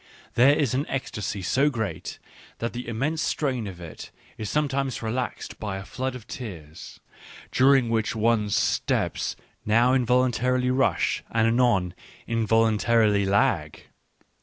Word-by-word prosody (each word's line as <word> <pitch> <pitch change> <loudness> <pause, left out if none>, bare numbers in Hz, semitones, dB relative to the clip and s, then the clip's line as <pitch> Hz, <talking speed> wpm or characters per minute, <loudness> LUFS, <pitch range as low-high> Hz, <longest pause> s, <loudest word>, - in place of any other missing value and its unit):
There 135 +4 +5
is 140 -5 0
an 135 +3 -1
ecstasy 105 -7 -4
so 135 +10 +2
great 110 -7 -4 0.4
that 115 - -3
the 120 0 -6
immense 135 +8 -1
strain 130 -7 -1
of 90 -3 -8
it 85 -2 -9 0.3
is 110 -2 -5
sometimes 140 -4 -1
relaxed 120 +3 -4
by 100 -3 -4
a 95 - -8
flood 130 +1 -4
of 120 -4 -9
tears, 85 - -9 0.5
during 135 -1 +4
which 115 -1 0
one's 110 -2 +1
steps - - 0 0.3
now 115 +4 +3
in 130 -1 +3
voluntarily 125 +1 +2
rush 130 +1 +1
and 115 -1 +2
anon 115 -7 +2 0.3
involuntarily 110 -2 +2
lag. 95 - +1
115 Hz, 135 wpm, -25 LUFS, 105-130 Hz, 0.5 s, There